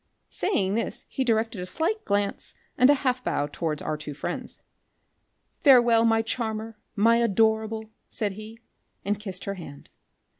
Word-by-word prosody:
Saying 200 - 0
this 230 +2 -3
be 265 - +1
directed 225 -4 0
a - - -4
slight 335 - -1
glance 200 -1 -1 0.2
and 255 +2 +5
a 290 - +7
half 255 0 +1
bow 145 - 0
towards 150 +1 -3
our 155 - -1
two 150 -1 -7
friends. - - -5 1.0
"Farewel, 240 -5 +6
my 225 0 +3
charmer, 225 -1 -3 0.2
my 230 +2 +4
adorable!" 220 0 +1 0.2
said 210 -2 -1
he, 215 +3 -10 0.5
and 205 +1 0
kissed 195 -3 -6
her 200 - -2
hand. 160 -7 -11
220 Hz, 150 wpm, -26 LUFS, 200-230 Hz, 1.0 s, a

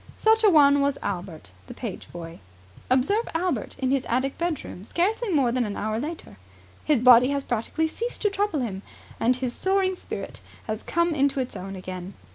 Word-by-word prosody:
Such 445 0 +3
a 425 - +7
one 285 -4 +6
was 280 0 +1
Albert, 175 - -5 0.2
the - - -9
page 225 -7 -7
boy. 170 -1 -8 0.5
Observe 285 - +2
Albert 330 - -1
in 265 -1 0
his 270 -2 +1
attic 260 +3 0
bedroom 315 - -3
scarcely 405 - 0
more 275 -9 +2
than 250 0 +1
an 205 -3 -4
hour 215 +1 -2
later. 305 - -6 0.5
His 295 -6 +2
body 250 0 +8
has 280 0 -1
practically 245 +8 -1
ceased 465 +10 -5
to 415 - +2
trouble 400 -7 0
him, 195 -6 -4 0.4
and 245 +2 +3
his 255 -1 -3
soaring 380 +2 +1
spirit - - -7 0.2
has 215 +1 -3
come 340 0 +1
into 280 -1 +1
its 255 -1 -3
own 195 +1 -6
again. 185 0 -7
265 Hz, 185 wpm, -25 LUFS, 220-340 Hz, 0.5 s, body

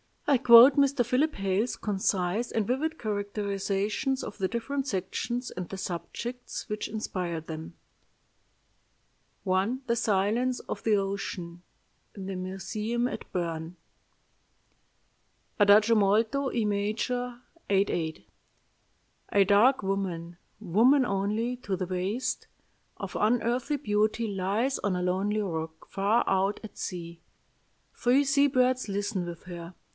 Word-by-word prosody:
I 285 -2 +4
quote 245 +2 +9
Mr. 280 -3 +3
Philip 275 +6 +1
Hale's 195 +4 0
concise 195 +2 -1
and 220 -2 0
vivid 310 +8 -1
characterizations 205 +4 -2
of - - -7
the 190 -3 0
different 265 +6 -3
sections 240 +4 -3
and 180 -1 -5
the 195 - -7
subjects 190 +8 -5
which 210 0 -3
inspired 180 -6 -4
them: 160 +1 -7 1.7
"I. 190 +6 +1
THE 235 - +2
SILENCE 230 +3 +1
OF - - -6
THE 220 -2 +3
OCEAN 195 -3 -4 0.5
(In 195 -2 -7
the 195 - -4
museum 215 +6 -2
at - - -8
Bern) 165 -1 -3 1.8
"Adagio 210 +2 +6
molto, 220 +7 +2
E 235 - 0
major, 230 +4 -1 0.3
8 200 0 +3
8. 160 -11 -3 1.1
A 200 - +6
dark 210 +6 +4
woman 180 -3 -3 0.2
woman 235 - +4
only 215 +4 -1
to 205 -6 -3
the 185 0 -3
waist 185 +7 -2 0.5
of - - -5
unearthly 245 +5 +1
beauty 215 -2 0
lies 205 +7 0
on 200 -3 0
a 180 - -1
lonely 195 +4 0
rock 160 -4 -5
far 200 +4 +2
out 195 +1 +1
at 220 - -10
sea. 170 -2 -6 0.7
Three 255 +4 +3
sea 280 +1 +4
birds 255 -2 +2
listen 200 -2 -2
with 170 -1 -8
her. 175 -1 -9
205 Hz, 125 wpm, -28 LUFS, 190-240 Hz, 1.8 s, quote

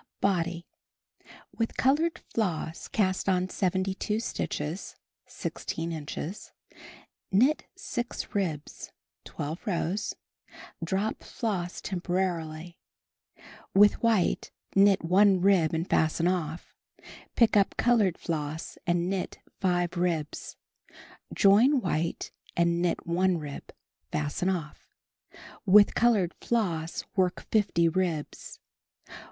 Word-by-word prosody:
Body. 175 -3 0 0.9
With 225 -1 -2
colored 315 +6 +2
floss 170 -7 -3
cast 190 -2 0
on 185 0 +1
72 190 +3 -1
stitches 160 -6 -4 0.3
(16 165 +1 -4
inches), 160 +4 -6 0.8
knit 255 +11 +3
6 245 -13 -5
ribs 165 -8 -3 0.3
(12 160 +10 -6
rows), 190 +2 -1 0.7
drop 195 +5 -1
floss 190 -7 -3
temporarily; 175 -3 -3 1.0
with 205 +1 +6
white 225 -6 +2 0.3
knit 195 -1 +5
1 190 +2 +5
rib 180 -4 +4
and 165 +2 -2
fasten 160 +2 +2
off; 170 -2 -2 0.6
pick 230 -3 +4
up 200 -2 +3
col 240 0 +4
ored 190 -5 +2
floss 155 -1 -4
and 175 0 +1
knit 190 -1 -3 0.2
5 175 -2 0
ribs; 165 -4 -2 0.7
join 230 +8 +5
white 170 -5 -2 0.3
and 170 0 +2
knit 175 -1 0
1 180 +1 +2
rib, 150 -3 -7 0.4
fasten 150 +5 -1
off; 165 -5 -4 0.8
with 205 +2 +7
colored 215 -7 +3
floss 175 -9 -1
knit 185 -2 +1
50 195 -6 +3
ribs. 170 -3 -3
180 Hz, 100 wpm, -28 LUFS, 165-205 Hz, 1.0 s, with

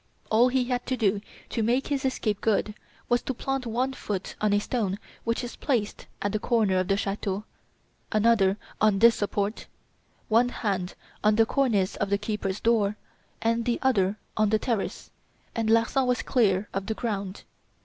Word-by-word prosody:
All 230 +3 +6
he 255 0 +1
had 250 0 -1
to 255 - 0
do 205 -3 +1 0.3
to 230 - -1
make 240 +5 +1
his 275 -2 -1
escape 215 -6 -1
good 215 -1 +1 0.3
was 240 0 +2
to 265 - -4
plant 270 0 -2
one 250 +4 0
foot 200 -7 -4
on 210 -1 +2
a 205 - +4
stone 205 -3 -1 0.3
which 230 +2 0
is 245 - -6
placed 230 -7 -2 0.2
at 205 - 0
the 215 - -1
corner 210 -5 +2
of 185 - -1
the 195 0 +2
chateau, 200 0 -2 0.7
another 210 -3 +3 0.2
on 215 -2 +4
this 230 +3 +7
support, 205 0 -2 0.6
one 235 +3 +4
hand 195 -6 -2 0.3
on 210 0 +4
the 225 +1 +5
cornice 225 -7 +1
of 200 - -1
the 200 - +2
keeper's 210 -2 -3
door 215 -3 +2 0.5
and 230 0 +1
the 240 -1 +1
other 205 -6 +2 0.2
on 215 -1 +2
the 220 - +3
terrace, 220 -2 -3 0.4
and 225 -2 -1
Larsan 230 +4 +3
was 250 -1 +1
clear 210 -5 +2
of 195 0 -3
the 220 - -1
ground. 200 -5 -4
220 Hz, 180 wpm, -27 LUFS, 200-240 Hz, 0.7 s, this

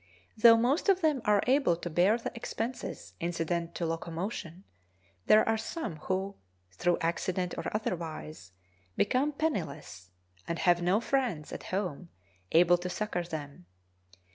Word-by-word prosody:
Though 230 +1 +8
most 260 - +2
of 380 -1 +4
them 305 -5 +2
are 210 -1 +4
able 260 -9 +3
to 175 - -6
bear 180 +7 +3
the 240 - -5
expenses 235 +1 -5
incident 170 0 -2
to 170 - -2
locomotion, 165 +2 -4 0.6
there 215 0 +6
are 225 0 +2
some 225 - -4
who, 190 +5 -3 0.3
through 175 - +1
accident 175 +2 -1
or 165 - -5
otherwise, 160 - -4 0.5
become 260 +7 +2
penniless, 155 - -3 0.4
and 170 - -2
have 175 0 +3
no 185 +5 +2
friends 235 - -1
at - - -7
home 185 -3 -3 0.4
able 175 +1 +5
to 180 +1 -4
succor 210 -2 -2
them. 145 - -7
180 Hz, 140 wpm, -30 LUFS, 165-225 Hz, 0.6 s, Though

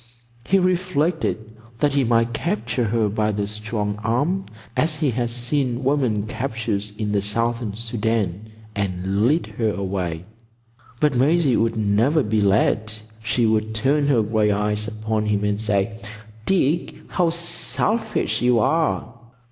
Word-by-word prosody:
He 195 - +3
reflected 180 -3 +1 0.4
that 145 +1 +2
he 140 -1 +3
might 115 0 +2
capture 125 - -1
her 110 0 +1
by 105 +1 0
the 100 0 -1
strong 105 0 -3
arm, 145 - 0 0.3
as 155 -1 +1
he 150 -4 +1
had 120 0 -1
seem 125 +1 -1
women 130 -7 +1
captured 110 -4 -2
in 105 -2 -2
the 100 -1 +1
Southern 115 +1 -1
Soudan, 110 -3 -2 0.2
and 100 +2 0
lead 155 +6 +2
her 110 -2 +2
away; 95 -4 -3 0.7
but 150 -3 +2
Maisie 140 +1 +3
would 115 0 +1
never 110 +9 +2
be 110 -1 +1
led. 105 +2 +2 0.3
She 115 +1 +1
would 110 0 +1
turn 140 +5 +2
her 125 -6 +3
gray 105 0 +1
eyes 105 +1 0
upon 110 0 -2
him 105 -1 +1
and 105 0 0
say, 105 0 0 0.5
"Dick, 170 -3 +1
how 175 -2 +2
selfish 170 +6 -1
you 125 -1 +4
are!" 155 -1 +1
115 Hz, 140 wpm, -22 LUFS, 105-140 Hz, 0.7 s, you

